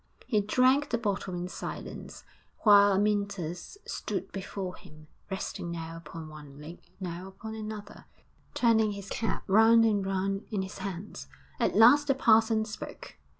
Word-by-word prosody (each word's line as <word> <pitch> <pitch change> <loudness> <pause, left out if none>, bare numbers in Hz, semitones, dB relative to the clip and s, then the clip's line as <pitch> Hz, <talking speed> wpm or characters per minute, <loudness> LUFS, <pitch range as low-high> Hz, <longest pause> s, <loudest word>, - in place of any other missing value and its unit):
He 215 -5 +2
drank 255 +7 +3
the 235 - +1
bottle 200 -4 -2
in 175 0 -3
silence, - - -7 0.4
while 205 -2 +7
Amyntas 200 - -1
stood - - -4
before 190 -1 -5
him, 155 0 -15 0.2
resting 190 -2 -4
now 165 -1 -5
upon 165 0 -9
one 145 -2 -12
leg 155 +4 -10 0.2
now 180 0 -5
upon 215 +3 -9
another, 215 -1 -8 0.5
turning 220 -3 +3
his 200 -1 -8
cap 225 - -2
round 225 +3 +6
and 205 -3 +2
round 195 +1 -2
in 205 -4 -1
his 190 +1 -8
hands. 195 +1 -6 0.3
At - - +1
last 270 +7 +7
the 275 - +3
parson 220 -3 +4
spoke. 220 - -9
200 Hz, 150 wpm, -29 LUFS, 180-220 Hz, 0.5 s, while